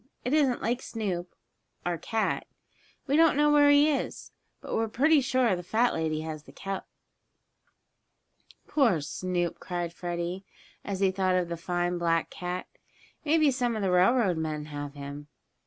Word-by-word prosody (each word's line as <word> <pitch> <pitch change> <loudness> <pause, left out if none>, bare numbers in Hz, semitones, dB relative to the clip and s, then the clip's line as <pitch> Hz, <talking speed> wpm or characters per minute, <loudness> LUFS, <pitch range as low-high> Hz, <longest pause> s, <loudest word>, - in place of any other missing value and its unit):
It 250 - 0
isn't 280 -5 +2
like 245 +3 0
Snoop, 185 -6 -4 0.5
our 175 -2 -1
cat. 225 -1 -1 0.6
We 280 - +1
don't 320 -2 +5
know 295 0 +4
where 290 -1 +6
he 290 +1 +6
is, 295 -3 -2 0.3
but - - -7
we're 225 - +1
pretty 290 +7 +4
sure 255 -5 +2
the 175 - -5
fat 225 +7 +1
lady 160 -1 -1
has 155 -1 -6
the - - -13
cup." 195 -1 -5 1.8
"Poor 235 - +3
Snoop!" 175 +2 -2
cried 175 -2 -4
Freddie, 175 +2 -4 0.4
as 195 -1 -4
he 195 -1 +4
thought 185 -1 +1
of 180 -2 0
the 170 - -2
fine 175 +1 -1
black 165 -1 +1
cat. 180 0 -4 0.6
"Maybe 310 -1 +4
some 245 -2 0
of 215 - -2
the 190 - +1
railroad 185 0 +3
men 155 -2 -3
have 145 0 -5
him." 145 +1 -8
185 Hz, 160 wpm, -28 LUFS, 170-250 Hz, 1.8 s, where